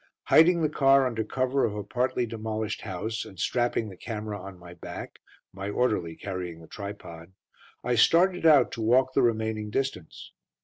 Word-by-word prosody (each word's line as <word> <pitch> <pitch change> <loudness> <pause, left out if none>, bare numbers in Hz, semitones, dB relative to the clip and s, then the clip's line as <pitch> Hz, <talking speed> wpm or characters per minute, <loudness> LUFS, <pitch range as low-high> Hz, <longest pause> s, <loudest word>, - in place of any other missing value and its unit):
Hiding 170 +1 +6
the 155 - +2
car 135 -2 +4
under 115 -3 -1
cover 130 +4 0
of 105 - 0
a 105 - -4
partly 125 +3 -1
demolished 110 -1 -4
house, 110 +5 -4
and 95 - -13
strapping 120 +1 0
the 95 - -10
camera 105 0 -6
on 95 0 -10
my 85 0 -12
back, - - -9 0.3
my 100 +1 -5
orderly 105 -8 0
carrying 90 -3 -6
the 80 - -14
tripod, 95 -4 -9 0.5
I 125 - 0
started 175 - +4
out 155 -4 +6
to 115 - -6
walk 130 +4 +3
the 135 - +3
remaining 110 -2 0
distance. 105 -9 -4
110 Hz, 170 wpm, -27 LUFS, 100-130 Hz, 0.5 s, Hiding